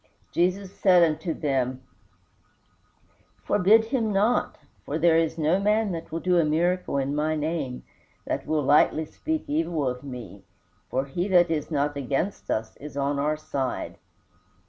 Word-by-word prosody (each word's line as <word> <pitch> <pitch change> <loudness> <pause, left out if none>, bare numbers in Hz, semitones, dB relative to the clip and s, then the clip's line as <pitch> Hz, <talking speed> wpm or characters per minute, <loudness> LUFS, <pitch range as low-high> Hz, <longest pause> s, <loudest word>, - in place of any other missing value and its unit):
Jesus 185 +2 0
said 180 -3 +5
unto 160 +1 0
them, 130 -4 -1 1.6
"Forbid 210 +3 +4
him 225 -2 -1
not, 210 +5 +1 0.3
for 150 - -3
there 165 0 +4
is 165 0 +1
no 160 +4 +2
man 210 +1 +1
that 165 -1 -6
will 165 - -2
do 180 0 +2
a - - +4
miracle 170 +1 0
in 135 +1 -1
my 155 +1 0
name 150 -4 -3 0.4
that - - -3
will 155 -1 +1
lightly 150 +3 +4
speak 315 - -3
evil 175 - -1
of 125 +1 -3
me. 125 -7 -9 0.5
For 130 +2 -1
he 175 +7 -2
that 175 -3 +4
is 155 -2 -2
not 145 -1 0
against 140 +8 -2
us 110 0 -2
is 145 -1 -9
on 140 0 0
our 150 +2 0
side." 135 -4 -4
155 Hz, 155 wpm, -26 LUFS, 140-180 Hz, 1.6 s, said